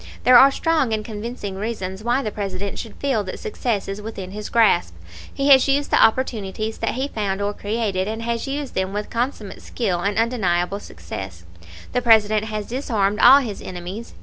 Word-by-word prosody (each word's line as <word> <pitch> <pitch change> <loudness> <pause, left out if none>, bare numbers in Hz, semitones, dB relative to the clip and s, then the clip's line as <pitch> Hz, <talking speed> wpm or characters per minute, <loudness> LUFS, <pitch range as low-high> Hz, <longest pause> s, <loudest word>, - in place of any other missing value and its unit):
"There 255 - +6
are 270 - +8
strong 290 -4 0
and 215 -1 -2
convincing 210 -2 -6
reasons 195 -2 -4
why 245 +4 +1
the 215 - -3
President 195 -1 -4
should 225 - -7
feel 265 -7 0
that 185 - -6
success 245 - -2
is 195 +1 -5
within 200 -4 -7
his 210 +1 -6
grasp. 205 - +3 0.4
He 275 +1 -1
has 265 -1 +7
used 280 +1 +1
the - - +5
opportunities 220 -3 0
that 225 - -1
he 265 +2 -1
found 200 -6 -3
or 205 0 -1
created, 205 -3 -2
and 220 +1 -4
he - - -5
has 230 +2 -3
used 280 -1 -4
them 190 +1 -2
with 210 0 -4
consummate 235 -4 -3
skill 195 -8 -2
and 200 +3 -1
undeniable 200 -5 0
success. 85 - -8 0.5
"The 250 - 0
President 215 -2 +4
has 215 -1 -4
disarmed 215 -5 -1
all 275 +2 +8
his 220 -6 -6
enemies. 185 +5 -7
215 Hz, 190 wpm, -22 LUFS, 195-240 Hz, 0.5 s, are